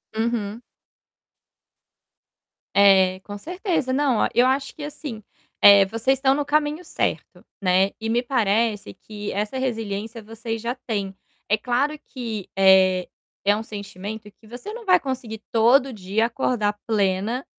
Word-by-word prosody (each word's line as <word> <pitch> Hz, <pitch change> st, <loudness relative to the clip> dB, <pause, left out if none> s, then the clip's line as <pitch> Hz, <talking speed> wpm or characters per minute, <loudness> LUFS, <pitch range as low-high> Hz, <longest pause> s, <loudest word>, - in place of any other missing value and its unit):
Uhum. 225 Hz, 0 st, -2 dB, 2.1 s
É, 190 Hz, -2 st, +5 dB
com 205 Hz, +1 st, -9 dB
certeza, 345 Hz, -, -2 dB
não, 270 Hz, -4 st, +2 dB
ó, -, -, +2 dB
eu 245 Hz, +3 st, +4 dB
acho 270 Hz, +1 st, -1 dB
que 300 Hz, -, -8 dB
assim, 280 Hz, -7 st, -7 dB, 0.4 s
eh, 200 Hz, -1 st, +8 dB
vocês 230 Hz, +7 st, 0 dB
estão 265 Hz, 0 st, +3 dB
no 290 Hz, +1 st, 0 dB
caminho 300 Hz, +3 st, 0 dB
certo, -, -, -3 dB, 0.2 s
né. 190 Hz, +1 st, +3 dB
E 225 Hz, -, -3 dB
me 240 Hz, +2 st, +1 dB
parece 220 Hz, -, 0 dB
que 210 Hz, -1 st, -7 dB
essa 210 Hz, +6 st, -3 dB
resiliência 225 Hz, -2 st, -4 dB
vocês 225 Hz, +1 st, -5 dB
já 235 Hz, +1 st, -2 dB
têm. 200 Hz, -4 st, -3 dB, 0.3 s
É 210 Hz, -, +3 dB
claro 260 Hz, +7 st, -1 dB
que, 230 Hz, -9 st, -7 dB
eh, 190 Hz, -1 st, +5 dB, 0.4 s
é 205 Hz, +1 st, +4 dB
um 215 Hz, -, -3 dB
sentimento 210 Hz, 0 st, -8 dB
que 215 Hz, +2 st, -22 dB
você 245 Hz, -, -8 dB
não 470 Hz, -1 st, -9 dB
vai 365 Hz, -2 st, +5 dB
conseguir 255 Hz, -6 st, -5 dB
todo 250 Hz, +4 st, +4 dB
dia 205 Hz, +2 st, 0 dB
acordar 230 Hz, -3 st, 0 dB
plena, 210 Hz, +4 st, 0 dB
225 Hz, 145 wpm, -23 LUFS, 205-260 Hz, 2.1 s, eh